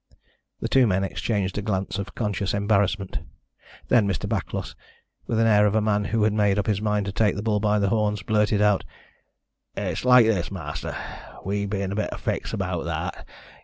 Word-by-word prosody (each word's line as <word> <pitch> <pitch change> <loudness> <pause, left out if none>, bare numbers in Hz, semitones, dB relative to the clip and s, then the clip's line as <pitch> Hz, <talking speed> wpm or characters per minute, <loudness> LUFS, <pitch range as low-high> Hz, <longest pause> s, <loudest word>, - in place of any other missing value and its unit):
The - - -1
two 130 -2 +4
men 95 -1 +1
exchanged 100 0 -2
a - - -2
glance 100 -1 -2
of 100 - -6
conscious 100 -3 -1
embarrassment. 100 -2 +1 0.7
Then 115 -5 +4
Mr. 95 -4 -2
Backlos, - - -3 0.5
with 115 - 0
the 115 - +4
air 105 -2 +5
of 105 - 0
a - - +5
man 105 -1 +1
who 110 0 +1
had 105 0 +3
made 105 -2 +2
up 105 - 0
his 105 -2 0
mind 105 -1 0
to 100 - -3
take 105 0 +2
the 105 - -4
bull 105 -2 +1
by 105 0 +2
the 100 -1 +1
horns, 105 -2 0
blurted 105 -1 +2
out: 105 -2 +3 0.9
"It's 90 -5 -2
like 125 -2 +7
this, 100 -6 +1
ma'aster. 80 -7 -5 0.5
We 100 +1 -1
be 100 0 -2
in 95 - -3
a - - -3
bit 110 - -1
o' - - -4
a - - -8
fix - - -3
about - - -2
that. - - -4
105 Hz, 205 wpm, -24 LUFS, 100-110 Hz, 0.9 s, like